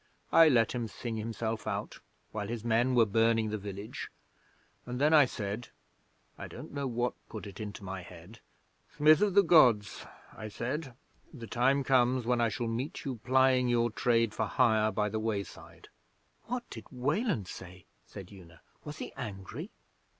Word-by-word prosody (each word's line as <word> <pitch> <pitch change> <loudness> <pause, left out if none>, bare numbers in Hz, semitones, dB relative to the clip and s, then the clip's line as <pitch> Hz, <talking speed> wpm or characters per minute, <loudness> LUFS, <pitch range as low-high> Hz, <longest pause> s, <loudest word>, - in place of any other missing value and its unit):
I 165 -1 +7
let 115 -5 +3
him 120 -2 -3
sing 115 +1 -5
himself 110 0 -4
out - - -4 0.3
while 105 -2 -4
his 115 0 -5
men 120 +2 +2
were 115 -2 +6
burning 115 +1 +2
the 110 - -1
village, 100 +1 -7 0.8
and 125 0 -4
then 150 +3 +3
I 150 -3 +8
said 105 0 -5 0.7
(I - - -6
don't - - -10
know 140 -1 -3
what 120 0 -1 0.2
put 110 -1 -7
it 100 -1 -10
into 105 -1 -7
my 95 0 -5
head), 90 +5 -13 0.6
"Smith 155 +1 +6
of 205 -2 +2
the 200 - +7
Gods," 125 - +4 0.3
I 110 - -7
said, 125 +5 -4 0.4
"the 120 -7 -9
time 135 +4 +2
comes 130 -2 +2
when 120 0 +1
I 115 - +3
shall 115 +2 -3
meet 120 +8 -4
you 130 -3 -3
plying 130 +2 +3
your 120 -1 +2
trade 115 -2 +1
for 110 -1 -1
hire 110 -3 +3
by 105 -1 0
the 110 +1 -2
wayside."' 110 -3 -5 0.6
'What 245 0 -4
did 115 -2 -8
Weland 140 - -1
say?' 90 -1 -10 0.2
said 95 -1 -10
Una. 85 -4 -15 0.2
'Was 150 0 -8
he - - -7
angry?' 100 -5 -7
115 Hz, 170 wpm, -30 LUFS, 105-130 Hz, 0.8 s, I